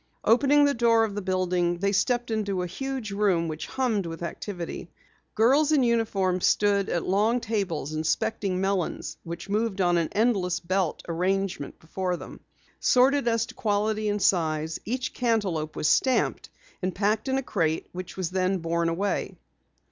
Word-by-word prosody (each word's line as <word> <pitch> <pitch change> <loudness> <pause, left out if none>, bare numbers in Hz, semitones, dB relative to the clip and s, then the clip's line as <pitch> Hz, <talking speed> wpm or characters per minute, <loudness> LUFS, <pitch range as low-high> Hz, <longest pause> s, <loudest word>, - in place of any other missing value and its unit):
Opening 285 +5 +5
the 285 - +3
door 230 -2 +3
of 220 -2 -1
the 205 - -3
building, 180 -2 0
they 200 +3 0
stepped 240 +4 +1
into 200 -4 -1
a - - -2
huge 260 +4 -4
room 195 -5 +1
which 155 0 -5
hummed 225 -8 -1
with 165 +1 -6
activity. 175 0 -6 0.5
Girls 275 +7 +4
in 290 -4 +4
uniforms 200 -6 +1
stood 200 -1 +2
at 170 - -1
long 215 +6 +2
tables 195 - -2
inspecting 190 +4 -1
melons 190 -3 -2
which 170 +2 -7
moved 210 0 -1
on 175 -2 +3
an 165 - -1
endless 205 -5 +1
belt 185 -1 -1
arrangement 185 -1 -1
before 180 +2 -3
them. - - -10 0.4
Sorted 265 +1 +3
as 230 -1 +2
to - - -12
quality 215 0 0
and 205 -1 -1
size, 160 -3 +1
each 255 +3 -3
cantaloupe 195 -11 -1
was - - 0
stamped 260 +9 +2 0.3
and 185 -1 -2
packed 210 +3 0
in 265 0 +1
a 270 - -1
crate 165 -8 -1
which 185 +1 -8
was 185 -2 -2
then 185 +1 +1
borne 170 0 0
away. 195 +5 -2
195 Hz, 165 wpm, -26 LUFS, 175-225 Hz, 0.5 s, Opening